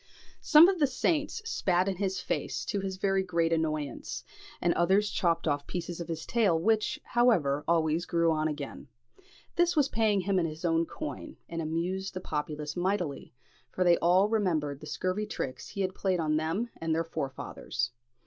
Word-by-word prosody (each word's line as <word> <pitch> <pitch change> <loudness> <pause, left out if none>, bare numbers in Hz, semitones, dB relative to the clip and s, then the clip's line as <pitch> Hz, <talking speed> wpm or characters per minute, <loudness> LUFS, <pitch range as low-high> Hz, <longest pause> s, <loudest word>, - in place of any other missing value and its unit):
Some 315 +2 +8
of 380 -2 +1
the 290 - +4
saints 305 - -1
spat 185 - +1
in 190 -2 -1
his 190 -1 -1
face, - - -3
to 205 - -1
his 190 -1 -4
very 195 0 +1
great 170 -3 +1
annoyance; 155 -3 -2 0.4
and 175 -1 +2
others 195 +5 +2
chopped 170 -3 +1 0.2
pieces 175 -1 -4
off - - -4
of - - -19
his 165 -2 -4
tail, 205 -9 +2
which, 215 +4 +1
however, 170 - +2
always 165 0 +1
grew 170 -1 +2
on 155 0 +1
again. 145 -1 -6 0.7
This 345 0 +3
was 290 -3 +3
paying 215 -3 +2
him 190 0 +1
in 165 - +1
his 155 +2 -6
own 165 0 +2
coin, 310 0 -7
and 165 0 -4
amused 175 +5 -2
the - - -2
populace 150 -2 -4
mightily, 180 -5 -2 0.4
for 185 - 0
they 175 -1 +5
all 180 +4 +4
remembered 165 -10 0
the 155 - -10
scurvy 185 +7 -2
tricks 130 -10 -5
he 200 - -4
had 185 -1 -1
played 185 -2 0
them 160 +8 0
and 165 -1 -1
their 165 - +1
forefathers. 140 -5 -4
175 Hz, 175 wpm, -29 LUFS, 160-200 Hz, 0.7 s, Some